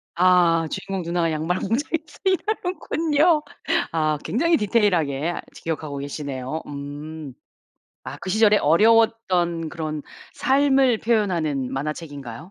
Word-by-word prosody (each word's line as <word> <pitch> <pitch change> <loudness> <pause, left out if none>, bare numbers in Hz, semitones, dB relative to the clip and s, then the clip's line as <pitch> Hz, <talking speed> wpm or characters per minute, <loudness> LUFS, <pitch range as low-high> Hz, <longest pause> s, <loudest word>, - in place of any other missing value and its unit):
아 170 -2 +4
주인공 195 -2 -4
누나가 170 -1 0
양말 160 +4 -1
공장에서 300 - -2
일하는군요. 350 -5 +1 0.5
아 155 -2 +1
굉장히 335 +8 +2
디테일하게 175 -9 +1 0.2
아직 - - -15
기억하고 155 -3 -4
계시네요. 140 0 -5
음. 145 0 -7 0.7
아 - - -6
그 185 - -4
시절에 215 0 +5
어려웠던 180 -2 +3
그런 155 -3 -4 0.3
삶을 270 -3 +3
표현하는 170 - 0
만화책인가요? 145 -3 -5
170 Hz, 295 characters per minute, -23 LUFS, 150-225 Hz, 0.7 s, 시절에